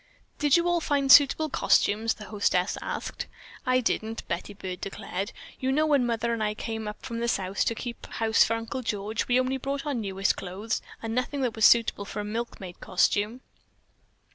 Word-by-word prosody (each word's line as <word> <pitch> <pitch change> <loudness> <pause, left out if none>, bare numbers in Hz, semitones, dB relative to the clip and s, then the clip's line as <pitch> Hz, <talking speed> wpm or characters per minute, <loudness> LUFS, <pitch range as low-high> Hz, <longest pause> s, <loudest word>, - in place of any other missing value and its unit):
"Did 295 +1 +4
you 340 +1 +1
all 350 -1 +2
find 280 -3 +2
suitable 290 +3 +7
costumes?" 215 -2 +2
the 215 - -10
hostess 200 -3 +1
asked. - - -4 0.4
"I 255 0 +3
didn't," 225 -1 -2
Betty 175 +4 -4
Byrd 185 -2 -6
declared. 195 +1 -4 0.3
"You 260 0 0
know 305 +3 +3
when 285 -5 +3
Mother 235 0 0
and 225 -2 -1
I 210 0 -1
came 220 -1 -4
up 210 - -7
from 230 0 -4
the 235 - -1
South 195 -3 0
to 230 - 0
keep 240 +1 -7
house 225 0 +3
for 230 - 0
Uncle 230 +4 -4
George, 215 -1 -2
we 250 +1 +4
only 255 +1 0
brought 275 +2 -3
our 295 - -1
newest 195 -4 0
clothes, 195 +5 -3 0.2
and 225 0 -3
nothing 255 +3 -1
that 245 -3 -1
was 220 - +4
suitable 230 -3 +4
for 205 - -6
a - - -2
milkmaid 210 -5 -5
costume. 210 +6 +1
225 Hz, 190 wpm, -27 LUFS, 205-255 Hz, 0.4 s, suitable